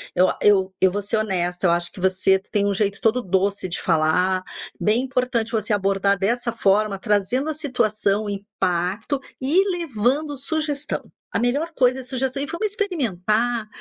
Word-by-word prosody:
Eu 185 +1 +4
eu 190 -2 +3
eu 190 -1 +5
vou 205 +2 -2
ser 205 +3 -1
honesta, 180 -4 0
eu - - +4
acho 175 0 +1
que - - -12
você 190 +1 +3
tem 200 +1 -1
um 200 - +1
jeito 200 0 0
todo 230 +3 +2
doce 195 -1 0
de 170 - -2
falar. 180 +3 +2 0.4
Bem 220 +4 +2
importante 250 -3 -1
você 220 -2 -1
abordar 200 0 +2
dessa 235 +5 0
forma, 210 -2 +2
trazendo 210 +8 0
a - - -1
situação, 215 -8 0
o - - -3
impacto, 200 - -2 0.2
e 345 +10 +2
levando 290 0 -1
sugestão. 300 +1 -2 0.3
A - - 0
melhor 280 +8 0
coisa 255 +1 +3
é - - -7
sugestão: 260 0 -2
E 280 +1 -1
vamos 340 +8 -2
experimentar, 240 - -1
215 Hz, 170 wpm, -22 LUFS, 195-260 Hz, 0.4 s, eu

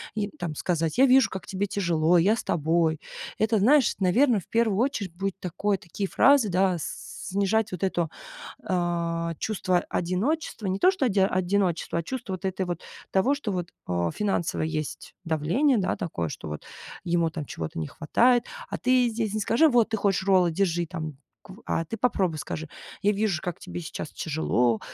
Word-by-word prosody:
и 210 -1 -1
там 170 -5 -5
сказать: 165 0 -1
"Я 265 - +7
вижу, 260 -4 +5
как 190 -1 -6
тебе 200 +1 -2
тяжело, 175 -3 +2
я 195 +6 +4
с - - -5
тобой". 160 0 +1 0.4
Это, 220 0 +2
знаешь, 260 +5 +4
наверно, 225 +5 +3
в 180 - -14
1 225 -4 +1
очередь 225 -8 -1
будет 195 +1 -3
такое 195 +3 -1
такие 190 +3 -4
фразы, 275 -6 +5
да, 185 0 +2
с 160 - -6 0.2
снижать 200 +2 +1
вот 180 -1 -5
это, 175 -4 0 0.5
а, 170 -2 -1
чувство 185 -4 0
одиночества. 200 - -1
Не 190 +1 -1
то, 370 - +6
что 370 -9 -1
оди 205 -4 +1
одиночество, 185 -3 +1
а - - -3
чувство 245 0 -5
вот 185 +1 -6
этой 190 0 -1
вот 175 -1 -4 0.3
того, 240 +9 +3
что 260 -7 -4
вот, 180 -2 -3 0.2
а, 85 -1 0
финансово 195 -7 -1
есть 155 -2 -4
давление, 170 - +2
да, 190 -3 0
такое, 85 - -3
что - - -7
вот 75 0 -6 0.4
ему 170 -1 +1
там 160 -2 -5
чего-то 80 - -6
не 80 - -3
хватает, 240 +10 +2 0.2
а - - -3
ты 255 -1 +3
здесь 220 -2 -2
не - - 0
скажи: 235 +10 +4
"Вот 240 -4 +3
ты 220 - -1
хочешь 195 -2 +1
роллы, 185 -3 +4
держи 175 -1 0
там 155 -5 -6 0.3
кв". 190 +3 -13
А 165 - 0
ты 225 - -5
попробуй 190 -9 +1
скажи: 160 +1 -5 0.4
"Я 205 - +4
вижу, 205 -4 0
как 180 -3 -4
тебе - - -6
сейчас 155 -1 -6
тяжело, 125 -7 0
185 Hz, 185 wpm, -26 LUFS, 170-215 Hz, 0.5 s, Я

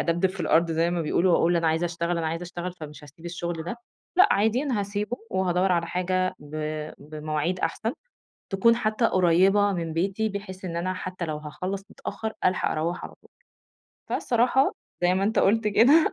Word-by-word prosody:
أدبدب 170 +2 +2
في 190 - -8
الأرض 165 +1 +3
زي 165 +1 +1
ما 175 -1 -1
بيقولوا 175 +3 +2
وأقول 170 +1 +3
أنا 165 -1 +1
عايزة 160 +2 +1
أشتغل 170 0 -2
أنا 165 - -1
عايزة 165 +2 -3
أشتغل 175 +1 -5
فمش 150 -3 -10
هاسيب 155 +4 -16
الشغل 170 -1 -4
ده، 180 - -4 0.4
لأ 380 +3 +7
عادي 220 +6 +2
أنا 250 -8 0
هاسيبه 205 +4 -3
وهادوَّر 185 0 +1
على 170 -1 +1
حاجة 185 +1 0
ب 145 0 -14 0.5
بمواعيد 155 +3 -3
أحسن، 220 +8 -1 0.6
تكون 230 +4 +4
حتى 220 0 +1
قريبة 190 +2 +4
من 165 -3 -3
بيتي 195 +6 0
بحيث 195 -2 -7
إن 170 -2 -4
أنا 185 +2 -1
حتى 185 -1 -5
لو 155 -1 -3
هاخلَّص 180 +6 -5
متأخر 220 0 -5
ألحق 185 0 +2
أروَّح 165 +3 -2
على - - -10
طول. - - -22 0.8
فالصراحة 250 +3 +2 0.3
زي 180 +1 +4
ما 195 +1 +1
أنت 220 - +1
قُلت 215 +2 +3
كده 280 - +5
180 Hz, 180 wpm, -26 LUFS, 170-205 Hz, 0.8 s, لأ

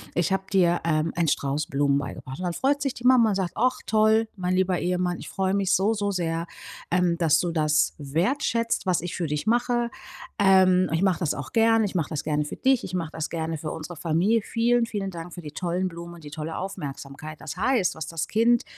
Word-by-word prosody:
ich 175 +2 +1
habe 195 0 0
dir, 175 -2 +4
ähm, 155 0 +1
einen 170 -2 +2
Strauß 140 +2 -1
Blumen 140 0 +1
beigebracht." 135 +1 -7
Und 185 - -3
dann 175 - -1
freut 285 +6 +1
sich 275 -3 -1
die 245 - -11
Mama 250 -3 +6
und - - 0
sagt: 185 -3 -2
,,Ach, 255 0 +2
toll, 220 +1 +3
mein 180 0 0
lieber 185 -1 +1
Ehemann. 180 0 -1
Ich - - -9
freue 190 0 -1
mich 195 -1 +1
so, 205 +4 +3
so 205 -1 -1
sehr, 170 -2 -2 0.4
ähm, 175 -1 +2
dass 160 -2 +3
du 175 - -1
das 150 -2 +2
wertschätzt, 225 - 0
was 185 -3 +1
ich 175 0 -5
für 170 -3 -1
dich 150 +3 -2
mache. 240 +1 +1 0.5
Ähm, 185 -2 +5
ich 165 - +1
mache 185 -4 +2
das 165 -5 0
auch 145 - -7
gerne. 225 0 +4
Ich 200 - -4
mache 165 -5 0
das 150 - -3
gerne 150 -1 0
für - - -6
dich. 265 -2 +2
Ich 185 - -8
mache 165 -3 -2
das 160 - -4
gerne 160 -1 -3
für 155 +1 -5
unsere 160 +2 -7
Familie. 175 +8 +2
Vielen, 235 +1 +2
vielen 200 -4 -4
Dank 170 0 -8
für 175 - -8
die 150 -3 -8
tollen 180 +3 -2
Blumen 170 0 -9
und 165 - -14
die 145 - -9
tolle 160 +1 -5
Aufmerksamkeit." 155 -4 -7
Das 160 - -7
heißt, 220 -2 +1
was 160 - -6
das 160 -1 -3
Kind 235 +2 +3
180 Hz, 230 wpm, -25 LUFS, 160-205 Hz, 0.5 s, Mama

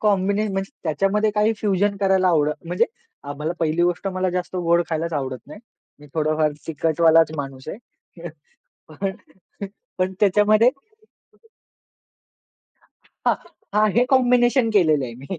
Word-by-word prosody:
कॉम्बिने 200 0 +1
म्हणजे 195 0 -3
त्याच्यामध्ये 195 +6 +1
काही 210 +1 +2
फ्युजन 200 -1 0
करायला 190 -1 +3
आवड 150 -3 +2
म्हणजे, 175 +2 +1 0.4
आम्हाला 145 +3 -4
पहिली 165 +1 0
गोष्ट 175 +2 0
मला 185 -1 -1
जास्त 180 +1 -4
गोड 170 -1 +2
खायलाच 165 +1 -2
आवडत 130 -3 -4
नाही. 210 - -12 0.4
मी 150 - -14
थोडाफार 155 -1 +1
तिकटवालाच 160 +1 +3
माणूस 135 -1 -7
आहे. 205 - -6 1.2
पण 195 +5 -3 0.9
पण 185 +1 0
त्याच्यामध्ये 210 +4 +4 2.6
हां, - - +4 0.4
हां. 210 0 +3
हे 245 - +5
कॉम्बिनेशन 245 -1 +3
केलेलं 155 -7 +3
आहे 120 -2 -7
मी. 140 +9 -8
180 Hz, 125 wpm, -22 LUFS, 155-205 Hz, 2.6 s, हे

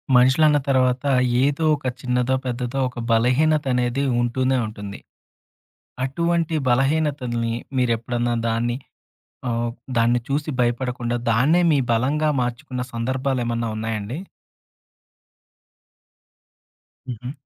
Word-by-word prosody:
మనుషులన్న 140 +5 +5
తర్వాత 130 0 +2 0.4
ఏదో 145 +3 +1
ఒక 145 -3 -6
చిన్నదో 125 +1 +1
పెద్దదో 125 +1 -2
ఒక 125 - -9
బలహీనత 135 +7 +3
అనేది 125 +2 0 0.2
ఉంటూనే 130 +2 +1
ఉంటుంది. 105 -2 -8 1.1
అటువంటి 170 +3 0
బలహీనతల్ని 130 -3 +1 0.2
మీరు 125 -2 +2
ఎప్పుడన్నా 120 +1 -1 0.2
దాన్ని 120 +2 0 0.7
ఆహ్, 120 0 -1 0.3
దాన్ని 120 +1 +3
చూసి 145 +3 -1
భయపడకుండా 120 0 -1
దాన్నే 135 +10 +4
మీ 145 - +3
బలంగా 140 +7 +1
మార్చుకున్న 125 +1 -3
సందర్భాలు 130 +3 -1
ఏమన్నా 115 0 -1
ఉన్నాయండి? 110 +3 -3 2.9
హుహు. 125 +2 -5
125 Hz, 95 wpm, -22 LUFS, 120-135 Hz, 2.9 s, మనుషులన్న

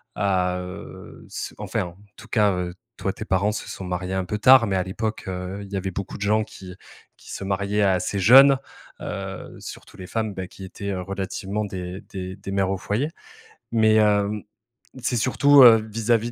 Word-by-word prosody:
à, 90 -2 +1
heu, 90 0 -9
ce - - -5
enfin - - -2
en 85 0 -9 0.2
tout - - -12
cas, 105 -3 +3
heu, 90 -1 -3 0.2
toi, - - -1
tes - - -7
parents 100 +3 +1
se 110 - -5
sont 95 - -7
mariés 90 +1 -3
un 95 - -1
peu 105 +4 -3
tard, 130 0 +7
mais 95 - 0
à 95 - +1
l'époque, 110 +4 -4
heu, 95 +2 -5
il 100 - -12
y 100 - -2
avait 95 0 -3
beaucoup 100 +1 -5
de - - -15
gens 110 +1 +2
qui 90 -3 -11 0.4
qui - - -13
se - - -5
mariaient 100 +2 0
assez 95 +1 +1
jeunes, 135 +6 +8 0.4
heu, 95 -2 -6
surtout - - -10
les 90 - -8
femmes, 110 -2 -2
beh 95 -1 -5
qui 95 - -12
étaient, 100 +2 -6
heu, 95 -2 -2
relativement 100 +2 -3
des 90 -1 -6
des 95 -1 -6
des 95 - -8
mères 95 -1 +1
au 95 - -1
foyer, 115 - -1 0.6
mais, 110 -1 +4
hem, 105 -1 +2 0.6
c'est 120 0 0
surtout, 140 +3 +6
heu, 115 -2 +10
vis-à-vis 115 +1 +1
100 Hz, 200 wpm, -24 LUFS, 95-110 Hz, 0.6 s, heu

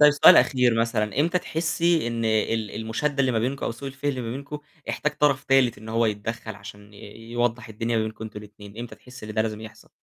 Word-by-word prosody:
طيب 150 0 +9
سؤال 145 - +8
أخير 125 -4 +4
مثلًا 115 +2 0
إمتى 170 +3 +2
تحسي 165 -2 +1
إن 115 -1 -2
ال 110 -1 +1
المشادة 140 +6 -1
اللي 130 -2 +2
ما 115 - +1
بينكم 130 +4 -2
أو - - -1
سوء 135 +4 -7
الفهم 135 +2 -2
اللي 130 -2 -4
ما 115 -1 -4
بينكم 140 +3 -6 0.3
احتاج 150 - -1
طرف 140 -3 +3
تالت 135 -3 +3
إن 110 +1 -11
هو 115 +1 +2
يتدخل، 110 +1 -4
عشان 105 0 -12
آآ - - -14 0.2
يوضح 120 +1 -2
الدنيا 115 +2 -2
ما 110 - +2
بينكم 110 0 -5
أنتم 105 -1 -7
الاتنين، 105 0 -13
إمتى 120 0 -6
تحسي 125 -3 -12
إن 105 - -7
ده 110 - +3
لازم 110 -1 -3
يحصل؟ 110 +1 -12
115 Hz, 225 wpm, -25 LUFS, 110-135 Hz, 0.3 s, طيب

